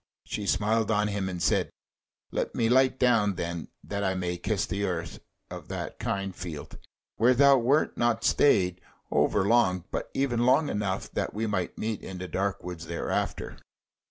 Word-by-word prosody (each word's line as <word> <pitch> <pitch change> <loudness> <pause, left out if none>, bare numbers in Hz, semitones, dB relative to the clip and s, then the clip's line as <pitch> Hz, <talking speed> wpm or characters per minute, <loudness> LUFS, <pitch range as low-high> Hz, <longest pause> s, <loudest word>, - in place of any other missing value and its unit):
She 105 - -4
smiled 110 +2 +1
on 105 -1 +2
him 100 -2 -2
and 90 -1 -4
said: 75 - +2 0.6
"Let - - -2
me 115 -1 +2
light 130 +1 +4
down 110 -6 +3
then, 85 -1 -4 0.2
that 100 0 -3
I 95 -1 0
may 90 -1 -2
kiss 105 +4 -1
the 100 0 -3
earth 85 -5 -3 0.3
of - - -8
that - - -5
kind 100 -1 -2
field, 85 -5 -7 0.4
where 125 +3 +4
thou 140 +1 +6
wert 135 +6 +2
not 120 -1 +1
stayed 90 -9 +3 0.3
over 100 -2 +2
long, 95 -5 +3
but - - -3
even 135 -4 +1
long 135 +5 +4
enough 100 -2 -2
that - - -3
we 110 +2 -1
might 95 -5 -2
meet 110 -1 -3
in 95 - -7
the 90 0 -5
dark 100 +2 -2
wood 90 -2 -6
thereafter." 85 +1 -3
100 Hz, 175 wpm, -28 LUFS, 90-115 Hz, 0.6 s, thou